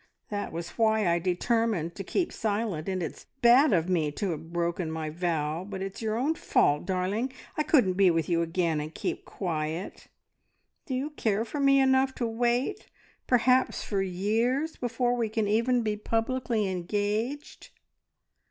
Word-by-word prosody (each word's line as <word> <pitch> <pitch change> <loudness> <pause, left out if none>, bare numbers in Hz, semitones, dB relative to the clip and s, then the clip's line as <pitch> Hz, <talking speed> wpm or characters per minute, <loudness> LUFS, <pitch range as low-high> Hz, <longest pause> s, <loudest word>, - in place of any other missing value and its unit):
That 205 -1 -3
was 170 +1 -5
why 220 -3 +3
I 170 0 +3
determined 185 -1 0
to 195 - -6
keep 345 - -1
silent, 205 -6 -2
and 185 -2 -1
it's 160 - -7 0.2
bad 250 +4 +7
of 170 -3 +2
me 165 -5 +1
to 195 +4 -2
have 160 +1 -7
broken 170 0 -1
my 160 -1 -4
vow, 165 -1 -1
but 190 -1 -5
it's 195 +3 -6
your 220 0 -1
own 280 +6 +1
fault, 150 - +1
darling! 195 +7 -1 0.2
I - - +1
couldn't 285 - +3
be 190 0 +5
with 165 -2 +1
you 170 -1 +2
again, 165 -2 0
and 155 +1 -7
keep - - -3
quiet. 160 -1 -4 0.8
Do 260 - -2
you 280 +4 -2
care 220 -6 0
for 285 +6 -5
me 275 0 +5
enough 265 0 +3
to 240 - -2
wait 240 - 0 0.4
perhaps 255 +1 +3
for 200 -2 -1
years 225 - 0
before 245 0 0
we 230 -3 -1
can 220 -1 0
even 235 +3 +2
be 215 -1 0
publicly 225 0 -1
engaged?" 205 +9 -3
210 Hz, 165 wpm, -28 LUFS, 175-245 Hz, 0.8 s, bad